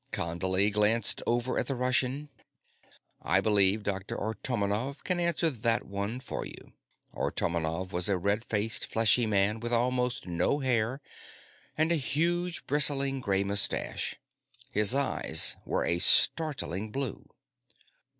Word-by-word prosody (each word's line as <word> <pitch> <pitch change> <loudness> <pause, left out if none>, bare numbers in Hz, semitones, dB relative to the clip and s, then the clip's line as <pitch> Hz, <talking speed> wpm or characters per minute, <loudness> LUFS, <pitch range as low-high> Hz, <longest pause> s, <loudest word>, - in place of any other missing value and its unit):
Condley 95 +4 -1
glanced 105 +1 +2
over 120 +2 -1
at - - -1
the 135 - -2
Russian. 130 +3 -1 0.9
"I - - +1
believe 105 0 +1
Dr. 95 -1 -5
Artomonov 110 +4 -4
can 180 -1 -1
answer 170 -1 +1
that 115 -2 -2
one 100 +5 -5
for 130 - -7
you." - - -12 0.4
Artomonov 85 +2 -3
was 90 +1 +1
a 95 - 0
red 100 +5 -2
faced, 110 -1 0
fleshy 115 +1 +3
man 105 +1 0
with 120 +1 -5
almost 125 +1 -1
no 90 +10 -1
hair 130 -1 -2 0.8
and 160 +2 0
a 170 - +2
huge, 170 +5 -2
bristling, 140 -1 +4
gray 100 -5 -1
mustache. 100 -3 +1 0.6
His 105 +4 +4
eyes 140 -1 +3
were - - -2
a 85 - -1
startling 110 - +4
blue. 135 -1 -6
115 Hz, 130 wpm, -28 LUFS, 100-135 Hz, 0.9 s, bristling